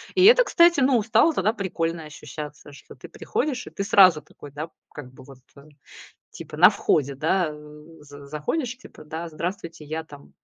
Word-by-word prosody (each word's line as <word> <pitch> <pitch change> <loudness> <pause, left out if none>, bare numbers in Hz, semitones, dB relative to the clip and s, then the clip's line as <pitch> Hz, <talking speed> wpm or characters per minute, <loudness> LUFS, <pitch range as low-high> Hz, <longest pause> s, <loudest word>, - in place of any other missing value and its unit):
И 370 0 +5
это, - - +7
кстати, 340 - +4
ну, 255 -3 +3
стало 235 +9 +3
тогда 215 -3 0
прикольно 170 -5 -3
ощущаться, 150 -1 -10
что 140 - -15
ты - - -12
приходишь, 265 -5 -3
и - - -7
ты 200 - -5
сразу 195 -6 +5
такой, 145 -1 -15
да, 150 +4 -7 0.2
как 135 -4 -10
бы, - - -15
вот, 135 -1 -15 0.2
э, 140 - -15 0.7
типа, - - -10
на - - +8
входе, 140 -2 0
да, 160 +4 0
э, 150 0 -13 0.2
з 145 -1 -13
заходишь, 235 - -3
типа, 255 - -15
да: 160 +3 -6
"Здравствуйте, 170 -1 -6
я 160 +2 -5
там, 145 -2 -16
165 Hz, 185 wpm, -23 LUFS, 150-220 Hz, 0.7 s, на